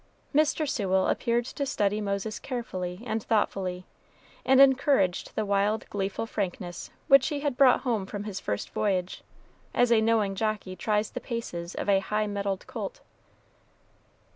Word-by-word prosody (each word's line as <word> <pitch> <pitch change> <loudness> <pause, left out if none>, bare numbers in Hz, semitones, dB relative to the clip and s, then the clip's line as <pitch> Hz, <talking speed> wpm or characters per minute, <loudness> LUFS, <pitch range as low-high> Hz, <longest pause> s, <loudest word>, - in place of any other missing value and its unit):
Mr. 305 +1 +2
Sewell 190 -8 +1
appeared 235 -1 +1
to 280 - -4
study 210 -5 0
Moses 200 +1 -2
carefully 185 -7 -5
and 220 -1 -1
thoughtfully, 190 -4 -1 0.6
and 265 0 +4
encouraged 265 -8 +3
the 215 - 0
wild, 200 +2 +1
gleeful 195 +2 -2
frankness 180 -4 -4 0.2
which 275 -2 +6
he 290 -2 -2
had 285 -3 -1
brought 260 -1 +5
home 225 -7 -1
from 205 0 -5
his 205 -3 -5
first 105 0 -3
voyage, 185 -3 -1 0.5
as 245 -1 +3
a 225 -2 +5
knowing 220 -3 +2
jockey 210 -2 -2
tries 210 +1 0
the - - -5
paces 180 -8 -5
of - - -4
a 195 -1 +4
high 210 +2 -1
mettled 200 -2 -3
colt. - - -6
210 Hz, 150 wpm, -27 LUFS, 195-240 Hz, 0.6 s, which